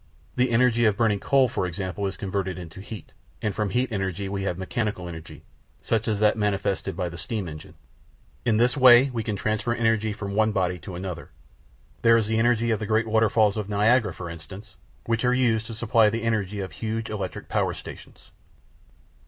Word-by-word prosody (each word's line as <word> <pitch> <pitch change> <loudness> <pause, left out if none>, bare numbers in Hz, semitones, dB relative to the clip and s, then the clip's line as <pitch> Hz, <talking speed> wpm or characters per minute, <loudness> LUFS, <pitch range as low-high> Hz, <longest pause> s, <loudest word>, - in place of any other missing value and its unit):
The 125 0 +2
energy 120 0 +3
of 105 -2 +3
burning 110 -4 +2
coal, 135 +3 +3
for 95 - -2
example, 95 +2 -3
is 95 - -5
converted 95 -2 -3
into 85 +1 -9
heat, 105 -3 -10 0.3
and 105 - -2
from 105 0 -1
heat 125 +5 0
energy 95 -1 -2
we 100 0 -3
have 90 -3 -2
mechanical 95 -1 -3
energy, 80 -1 -9 0.4
such 110 -1 0
as 105 -2 0
that 105 0 +4
manifested 100 -3 -1
by 90 -2 -1
the 85 -1 -8
steam 105 +1 -4
engine. 75 -1 -10 0.7
In 115 -3 +2
this 120 +4 +3
way 130 0 +7
we 115 -2 -2
can 110 -1 -3
transfer 110 +3 -1
energy 115 -2 +1
from 100 -1 -5
one 110 +1 +2
body 90 -2 0
to 85 +3 -8
another. 90 -1 -6 0.7
There 115 0 +6
is 110 - +1
the 110 +1 0
energy 115 0 +2
of 110 - 0
the 110 - -4
great 110 +1 +2
waterfalls 110 -1 +3
of 105 -1 -3
Niagara, 105 +1 +3
for 85 0 -7
instance, 95 +4 -10 0.3
which 115 -1 0
are 125 0 +3
used 115 -4 +1
to 115 - -7
supply 115 -1 +3
the 115 +2 -3
energy 105 -3 -1
of 95 -3 -5
huge 110 +8 -4
electric 100 -4 -5
power - - 0
stations. - - -12
105 Hz, 195 wpm, -25 LUFS, 95-115 Hz, 0.7 s, way